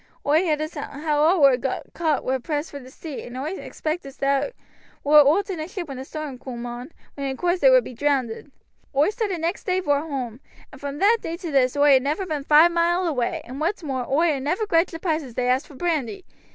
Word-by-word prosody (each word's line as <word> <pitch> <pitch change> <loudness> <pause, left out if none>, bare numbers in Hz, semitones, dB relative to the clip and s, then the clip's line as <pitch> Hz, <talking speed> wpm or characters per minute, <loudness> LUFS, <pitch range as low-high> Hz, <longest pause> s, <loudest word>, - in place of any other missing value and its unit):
Oi 300 +3 +4
heerd 310 -4 0
as 310 +2 -4
how 295 0 -2
all 325 +5 +5
as 260 -2 +5
war 265 0 -2
caught 315 -4 0
war 260 +1 0
pressed 295 +4 -3
for 280 -2 -8
sea, 290 +1 -8
and 245 +1 -9
oi 285 +5 -3
expect 325 -3 -4
they 275 - -1 0.5
war 300 +1 +7
oot 310 +8 +4
in 355 - -4
a 310 - -4
ship 365 -2 -6
when 270 -3 -7
a - - -5
storm 300 -4 -6
coom 245 -2 -7
on, 245 +4 -7 0.2
when 280 -1 -4
in 265 -1 -3
coorse 355 +1 0
they - - +6
would - - +6
be - - -8
drownded. 270 -1 -1 0.4
Oi 290 +8 +3
started 420 -6 -2
next 335 +4 -2
day 370 -1 +1
vor 290 -6 +1
hoam, 260 -7 -5 0.3
and 270 - -14
from 285 0 -5
that 430 +7 +4
day 330 +1 -4
to 340 -3 -6
this 265 -1 +2
oi 285 -2 +6
ha' - - -9
never 300 +8 -1
been 305 -5 -3
five 310 +4 +6
mile 345 +2 +2
away, 255 -8 -1
and 260 +4 -8
what's 355 +3 -1
more, 260 -4 -3
oi 315 +4 +3
ha' 275 - -3
never 355 +11 -1
grudged 335 -3 +2
the 330 - -5
price 325 -2 -1
as 255 -5 -11
they 250 -1 0
asked 255 +3 +1
for 290 - -14
brandy. 335 - -2
295 Hz, 240 wpm, -23 LUFS, 270-340 Hz, 0.5 s, war